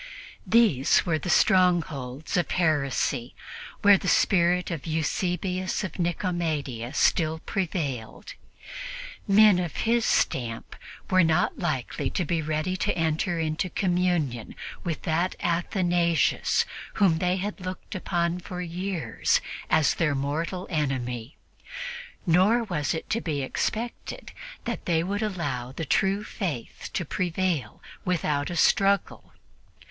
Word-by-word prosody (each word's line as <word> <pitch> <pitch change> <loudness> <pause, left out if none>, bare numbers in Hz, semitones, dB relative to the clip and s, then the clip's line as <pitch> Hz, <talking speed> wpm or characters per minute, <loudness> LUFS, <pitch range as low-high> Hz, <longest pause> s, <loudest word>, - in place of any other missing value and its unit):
These 210 - +4
were 165 -3 +1
the 175 - -5
strongholds 160 -8 +2
of 175 - +1
heresy, 140 -6 0 0.5
where 200 -2 +7
the - - -5
spirit 180 -1 +3
of 165 -1 -5
Eusebius 180 +4 -1
of 190 - -6
Nicomedia 160 - -1
still 160 -1 +2
prevailed. 160 - -3 0.9
Men 205 -1 +6
of 175 -4 -3
his 235 +1 +3
stamp 115 - 0 0.4
were 185 -1 +6
not 160 +1 +2
likely 130 -9 -2
to 180 - -1
be 165 +1 0
ready 155 +4 -1
to - - -1
enter 165 +2 0
into 160 +2 -1
communion 175 - 0 0.3
with 165 -4 -3
that 170 +2 0
Athanasius 175 -1 +1 0.3
whom 180 -6 +3
they 180 +1 +1
had 200 +1 -4
looked 185 +3 -6
upon 175 -2 -1
for 180 0 -7
years 175 -6 -1 0.3
as 155 - +4
their 150 -4 +1
mortal 160 +7 -2
enemy, 130 -5 -2 0.9
nor 190 +8 +4
was 165 -8 -1
it 160 - -5
to 230 - +1
be 145 -4 -2
expected 230 - -3 0.3
that - - -4
they 165 -2 +2
would 200 +4 -2
allow 145 - -2
the 160 +4 -5
true 195 +7 +1
Faith 170 - -5
to 175 - -1
prevail 175 - -2 0.2
without 150 -5 0
a 175 - -4
struggle. 195 +3 +2
170 Hz, 120 wpm, -26 LUFS, 150-185 Hz, 0.9 s, where